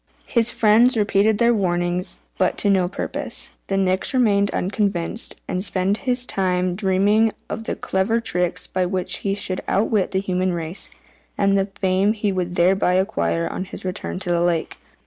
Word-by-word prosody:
His 235 -1 +3
friends 230 +3 +4
repeated 210 0 +2
their 235 +1 +4
warnings, 175 -3 -1 0.2
but 185 - +1
to 205 - +3
no 185 -2 +2
purpose. 185 - -3 0.2
The 195 - -1
Nix 190 +5 0
remained 200 -5 +3
unconvinced, 200 +1 -1
and 185 +1 -2
spent 195 0 0
his 250 0 +1
time 185 -4 0
in 175 - -3
dreaming 205 +3 +2 0.2
of 225 - -5
the - - -2
clever 190 +5 0
tricks 180 -4 -1
by 185 -1 -1
which 185 -1 -2
he 195 -1 -2
should 190 -2 -2
outwit 205 -1 +1
the 190 - 0
human 185 -1 -1
race, 170 +2 -2 0.5
and 195 0 +2
the 195 0 +1
fame 190 +2 +1
he 210 -2 -1
would 180 -2 -3
thereby 180 +1 +3
acquire 85 - 0
on 185 - -4
his 185 - -9
return 185 0 -3
to 180 - -2
the 170 0 +2
lake. 170 -2 -1
190 Hz, 175 wpm, -21 LUFS, 180-205 Hz, 0.5 s, friends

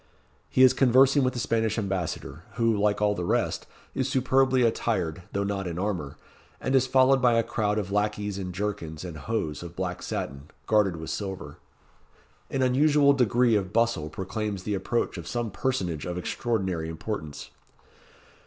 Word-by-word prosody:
He 130 - +4
is 130 0 +7
conversing 135 +2 +5
with 125 0 +1
the 125 - -4
Spanish 115 -2 0
Ambassador, 95 -5 -3
who, 115 -2 +2
like 105 0 +1
all 105 0 +3
the 90 - -4
rest, 85 - 0 0.3
is - - -1
superbly 130 0 +3
attired, 95 -8 0
though 100 - -1
not 100 -2 -2
in 85 -1 -4
armour, 90 -7 -3 0.4
and 130 - -2
is 130 -1 +4
followed 130 +1 +4
by 125 -2 +4
a 115 0 +3
crowd 110 -2 -1
of 100 -2 -2
lacqueys 105 -1 -1
in 90 -1 -4
jerkins 90 -4 -4
and 85 -3 -6
hose 80 -2 -3
of 85 0 -9
black 90 -1 -3
satin, 70 +2 -5 0.2
guarded 105 -4 +3
with 80 0 -6
silver. 95 -2 -5 0.9
An 135 - 0
unusual 140 +2 +4
degree 120 -2 +3
of 95 -3 -1
bustle 115 -10 +1
proclaims 100 +2 -4
the 105 - -2
approach 100 0 -1
of 85 - -8
some 120 -3 -2
personage 95 - -2
of 90 0 -3
extraordinary 95 -4 -2
importance. 80 -3 -6
105 Hz, 165 wpm, -27 LUFS, 90-120 Hz, 0.9 s, is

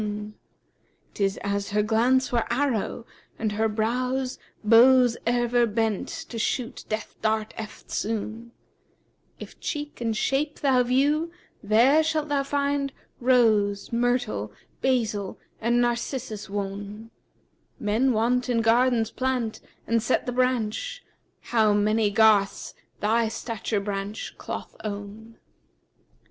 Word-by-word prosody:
[FN#356] 210 0 -4 0.8
'Tis 195 -1 0
as 200 0 -1
her 210 +1 +1
glance 245 +4 +2
were 235 -2 0
arrow, 240 -4 -1 0.3
and 220 -1 -1
her 220 +2 +1
brows 250 +4 -1
* - - -39
Bows 245 0 +7
ever 240 0 +2
bent 220 -2 -1
to 230 - -6
shoot 235 +2 -2
Death 215 0 -3
dart 220 0 0
eftsoon: 220 +1 -4 0.9
If - - -10
cheek 295 -4 -5
and 225 -2 -1
shape 290 +5 0
thou 265 -4 +4
view, 285 +6 +2 0.3
there 235 +9 +5
shalt 310 -1 -1
thou 285 -1 +2
find 280 0 -1 0.2
* - - -41
Rose, 210 -4 +3
myrtle, 240 - 0 0.3
basil 220 -7 0 0.2
and 235 +2 +2
Narcissus 240 -3 -2
wone. 205 +2 -5 0.7
Men 225 +6 +2
wont 245 +3 +1
in 235 -2 +2
gardens 230 0 +3
plant 255 -4 -2 0.2
and 230 0 +1
set 255 - 0
the 250 - -2
branch, 255 - -1 0.2
* - - -44
How 220 -3 +4
many 210 +1 +2
garths 210 -2 +3 0.3
thy 225 +2 +2
stature 225 -1 -3
branch 200 +1 -4
cloth - - -6
own!' 210 +2 -7
230 Hz, 125 wpm, -25 LUFS, 215-255 Hz, 0.9 s, Bows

